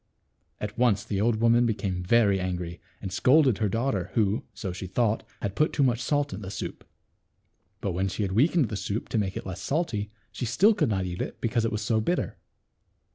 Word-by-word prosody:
At 105 +2 -5
once 115 -5 +3
the 100 -1 -2
old 115 +1 +3
woman 115 +2 +4
became 100 -5 -1
very 100 +1 +3
angry, 90 -2 -4 0.2
and 95 -2 -4
scolded 130 +1 +4
her 105 - +1
daughter, 110 -4 -1
who, 105 -1 +2
so 100 -3 -5
she 95 +1 -6
thought, 110 +3 +1 0.2
had 100 -2 -1
put 155 - +2
too 145 - +2
much 125 -2 +2
salt 145 +1 0
in 95 - -6
the 95 - -6
soup. 100 - -6 1.0
But 100 - -1
when 95 +2 0
she 95 +3 -2
had 95 - -1
weakened 140 - +3
the - - -3
soup 100 +3 -3
to. 115 - +1
make 95 -2 -2
it - - -6
less 95 -1 -6
salt, 160 0 -1 0.4
she 125 - -4
still 195 - +5
could 155 - +1
not 95 -3 0
eat 90 0 -4
it, - - -5
because 115 0 0
it 115 - 0
was 105 0 -2
so 110 0 +1
bitter. 175 +11 -1
110 Hz, 215 wpm, -27 LUFS, 95-120 Hz, 1.0 s, still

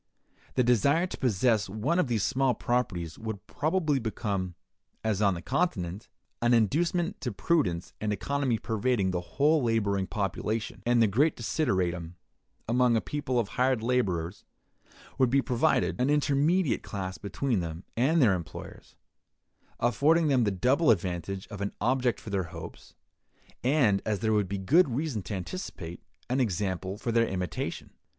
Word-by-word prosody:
The 125 - +3
desire 140 - +3
to 185 - -6
possess 110 -3 +2
one 120 - 0
of 180 - +2
these 115 -4 0
small 135 -2 +2
properties 90 -11 -2
would 110 -4 -6
probably 155 -1 0
become, 100 -5 -3 0.5
as 110 -2 0
on 100 -3 +3
the 85 - -7
Continent, 95 - -1 0.3
an 120 +1 +4
inducement 170 - +1
to 125 -5 -2
prudence 95 - 0
and 105 0 0
economy 135 +3 0
pervading 110 -3 0
the 90 -1 -1
whole 150 - +2
laboring 100 -5 +1
population; 105 +2 -3
and 120 -1 +4
that 110 - +3
great 145 +10 +2
desideratum 90 - -1 0.5
among 120 0 +3
a - - +3
people 130 0 -3
of 110 -4 -1
hired 125 -1 +1
laborers 95 -8 -1 0.8
would 130 -2 +4
be 135 +3 +3
provided, 125 -1 +1
an 130 - +2
intermediate 150 +3 +2
class 95 -2 -5
between 115 +3 -1
them 85 0 -5
and 140 +8 +3
their 105 -5 +5
employers; 85 -3 -7 0.8
affording 150 +7 +3
them 130 -4 +3
the - - +2
double 125 - +2
advantage 95 -1 0
of 105 -3 -7
an 100 - -2
object 125 -1 +1
for 105 - -9
their 95 -3 0
hopes, 80 -1 -10 0.7
and, 125 -7 +3
as 105 -3 -1
there 110 -1 +2
would 105 -3 +1
be 100 - -2
good 145 - +4
reason 130 -2 -2
to 100 +3 -5
anticipate, 90 - -6 0.3
an 125 +2 0
example 95 -4 -1
for 115 - -3
their 115 0 +3
imitation. 90 -3 -4
115 Hz, 155 wpm, -28 LUFS, 95-135 Hz, 0.8 s, their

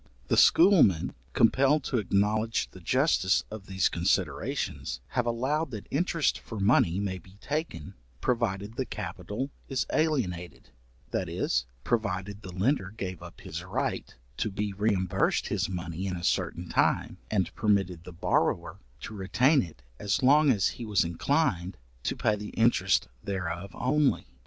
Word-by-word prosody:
The - - +3
schoolmen, 165 - +5 0.2
compelled 135 +5 +4
to 125 - 0
acknowledge 105 +3 0
the 95 - -12
justice 115 - +2
of 105 -2 -8
these 95 -1 +2
considerations, 60 - -1
have 125 -2 -1
allowed 135 +7 0
that 110 -5 -7
interest 165 +1 +1
for 110 - -7
money 100 -4 +3
may 95 -2 -2
be 95 +2 -18
taken, 150 - -4 0.3
provided 110 - -1
the 130 - 0
capital 105 +7 -5 0.2
is 135 -2 0
alienated, 105 - -1 0.4
that - - -1
is, 65 -1 0 0.2
provided 100 0 -2
the 95 -3 -8
lender 95 +2 0
gave 95 -4 -6
up - - -11
his - - -6
right - - -3 0.2
to 110 - 0
be 100 0 -3
reimbursed 95 -3 +1
his - - 0
money 90 0 -4
in 90 - -2
a 85 - -7
certain - - -1
time, - - +1
and 95 -5 0
permitted 95 -5 +1
the 90 - -9
borrower 85 - 0 0.2
to - - -7
retain 125 +9 +3
it 75 -7 -9 0.2
as 100 +4 0
long 145 +3 +6
as 105 -8 +3
he 120 - -7
was 105 -6 +2
inclined 95 - 0 0.2
to - - -2
pay 105 - +1
the 105 0 -7
interest 115 - +3 0.2
thereof 90 -1 -3
only. 140 +2 +1
105 Hz, 150 wpm, -28 LUFS, 95-125 Hz, 0.4 s, long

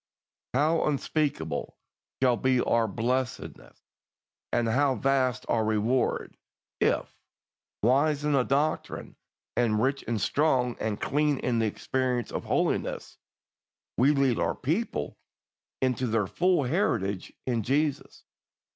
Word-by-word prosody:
How 155 +4 +2
unspeakable 140 - -2 0.5
shall 125 -2 +5
be 130 +1 +2
our 115 -2 +2
blessedness, 125 +4 -3 0.7
and 120 - +1
how 135 +3 +2
vast 130 -4 +1
our 115 -2 +1
reward, 110 +4 0 0.4
if, - - 0 0.7
wise 145 +5 +3
in 150 - +1
the 140 -2 +4
doctrine, 140 +4 -1 0.4
and 110 -3 +2
rich 135 +4 0
and 115 -1 -1
strong 125 -1 +1
and 110 -1 -2
clean 150 0 +1
in 120 -3 0
the 110 - +2
experience 125 +2 -2
of - - -4
holiness, - - -1 0.8
we 130 +4 +4
lead 135 -4 +2
our - - 0
people 150 - -2 0.6
into 130 -1 +1
their 110 -2 +1
full 180 - +2
heritage 115 - -1
in 120 -3 0
Jesus! 140 +5 -1
130 Hz, 120 wpm, -28 LUFS, 115-145 Hz, 0.8 s, shall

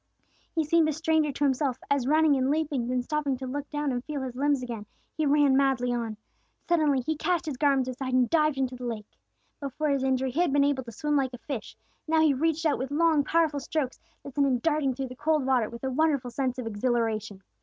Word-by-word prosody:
He 320 - +2
seemed 320 +1 +3
a - - 0
stranger 315 -1 +1
to 290 - -3
himself, 265 -2 +1
as 275 -3 +1
running 310 0 +4
and 260 0 +1
leaping, 290 -5 0
then 250 0 0
stopping 290 -1 -1
to 260 - -6
look 280 +2 -5
down 295 -2 -1
and 245 -1 -2
feel 290 -2 -4
his 255 -2 -5
limbs 280 0 +1
again, 230 -4 -6 0.3
he 310 -2 0
ran 285 -1 +4
madly 265 -3 +2
on. 230 -3 -3 0.5
Suddenly 305 -6 +3
he 315 +6 -2
cast 350 +2 0
his 300 -4 -3
garments 270 -1 +2
aside 255 0 -4
and 255 -1 +4
dived 305 -2 +2
into 260 -1 -1
the 250 0 -7
lake. 220 -3 -4 0.5
Before 290 +2 -2
his 275 -2 +1
injury, 265 -1 +1
he 285 - -3
had 350 -5 +2
been 285 0 +4
able 280 -2 +1
to 235 - -8
swim 295 +7 -1
like 260 -2 0
a - - -10
fish, 240 -1 -6 0.3
now 320 0 +3
he 315 -2 +4
reached 320 +4 0
out 305 - +2
with 260 +1 -3
long 310 0 +3
powerful 315 -1 +1
strokes 275 -1 -3 0.2
that 280 - -9
sent 280 +1 +2
him 255 -2 +2
darting 290 -1 0
through 265 0 -4
the 255 - -9
cold 295 0 +1
water 255 -5 +2
with 235 +2 -10
a 265 - -1
wonderful 280 -3 +1
sense 255 0 -2
of 250 - -4
exhilaration. 215 -3 -1
275 Hz, 235 wpm, -27 LUFS, 255-300 Hz, 0.5 s, running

